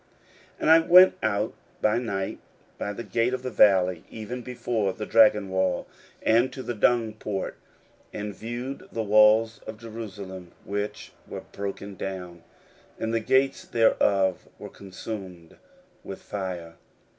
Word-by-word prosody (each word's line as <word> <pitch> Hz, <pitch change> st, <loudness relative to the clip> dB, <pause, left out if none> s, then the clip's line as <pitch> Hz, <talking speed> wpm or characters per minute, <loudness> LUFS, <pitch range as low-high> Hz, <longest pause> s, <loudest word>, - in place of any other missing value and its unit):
16:002:013 -, -, -17 dB
And -, -, +2 dB
I 165 Hz, -, +9 dB
went 180 Hz, +3 st, +7 dB
out 110 Hz, 0 st, 0 dB, 0.3 s
by 110 Hz, +2 st, +2 dB
night 100 Hz, -5 st, -3 dB, 0.4 s
by 105 Hz, -, -2 dB
the 115 Hz, +3 st, -6 dB
gate 120 Hz, +3 st, 0 dB
of 130 Hz, -, -8 dB
the 130 Hz, -, -3 dB
valley, 95 Hz, -6 st, +4 dB
even 115 Hz, +3 st, -6 dB
before 120 Hz, -5 st, -2 dB
the 105 Hz, -, -6 dB
dragon 105 Hz, -4 st, +4 dB
well, 95 Hz, -1 st, 0 dB, 0.4 s
and 120 Hz, +3 st, +3 dB
to 130 Hz, 0 st, -7 dB
the 120 Hz, -, -3 dB
dung 115 Hz, 0 st, +2 dB
port, 105 Hz, -3 st, -4 dB, 0.6 s
and 105 Hz, 0 st, -5 dB
viewed 120 Hz, +6 st, -6 dB
the 115 Hz, -, -2 dB
walls 110 Hz, +2 st, +5 dB
of 110 Hz, -, -6 dB
Jerusalem, 100 Hz, -6 st, -8 dB
which 105 Hz, +1 st, -4 dB, 0.2 s
were -, -, -6 dB
broken 100 Hz, 0 st, -5 dB
down, 90 Hz, -2 st, -6 dB, 0.6 s
and 110 Hz, 0 st, -2 dB
the 115 Hz, -, +2 dB
gates 130 Hz, +4 st, +2 dB
thereof 100 Hz, -4 st, +2 dB
were -, -, -9 dB
consumed 95 Hz, -3 st, -9 dB, 0.5 s
with -, -, -7 dB
fire. 90 Hz, -4 st, -6 dB
105 Hz, 145 wpm, -26 LUFS, 95-115 Hz, 0.6 s, I